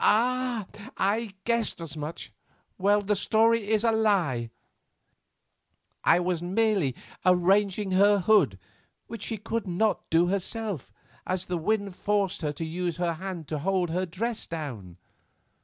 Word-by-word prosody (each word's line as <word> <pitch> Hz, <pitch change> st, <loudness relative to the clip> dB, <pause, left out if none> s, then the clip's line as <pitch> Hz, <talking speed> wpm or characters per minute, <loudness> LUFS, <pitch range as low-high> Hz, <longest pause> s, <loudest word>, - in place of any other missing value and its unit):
Ah! 245 Hz, 0 st, +2 dB, 0.3 s
I 205 Hz, +1 st, 0 dB
guessed 235 Hz, -4 st, 0 dB
as 165 Hz, -3 st, -7 dB
much. 150 Hz, +2 st, -6 dB, 0.5 s
Well, 205 Hz, +2 st, +3 dB
the 205 Hz, +1 st, 0 dB
story 220 Hz, +1 st, +2 dB
is 220 Hz, 0 st, +2 dB
a 230 Hz, -, +4 dB
lie; 185 Hz, -, +1 dB, 1.5 s
I -, -, +5 dB
was 180 Hz, -1 st, -1 dB
merely 190 Hz, -, +1 dB, 0.3 s
arranging 190 Hz, +2 st, +3 dB
her 200 Hz, +2 st, +5 dB
hood 180 Hz, -, +4 dB, 0.5 s
which 230 Hz, -3 st, -8 dB
she 225 Hz, +1 st, -3 dB
could 220 Hz, +1 st, -3 dB
not 205 Hz, +5 st, 0 dB
do 165 Hz, +2 st, +4 dB
herself, 200 Hz, -, -2 dB, 0.4 s
as 185 Hz, 0 st, -1 dB
the 180 Hz, -, -2 dB
wind 200 Hz, +1 st, -1 dB
forced 200 Hz, -2 st, 0 dB
her 150 Hz, -2 st, -1 dB
to 160 Hz, +2 st, -5 dB
use 170 Hz, +1 st, -3 dB
her 175 Hz, -1 st, 0 dB
hand 175 Hz, -2 st, -6 dB
to 155 Hz, -, -2 dB
hold 180 Hz, +1 st, 0 dB
her 185 Hz, +2 st, -1 dB
dress 225 Hz, +7 st, -3 dB
down." 120 Hz, -, -6 dB
190 Hz, 140 wpm, -27 LUFS, 170-215 Hz, 1.5 s, I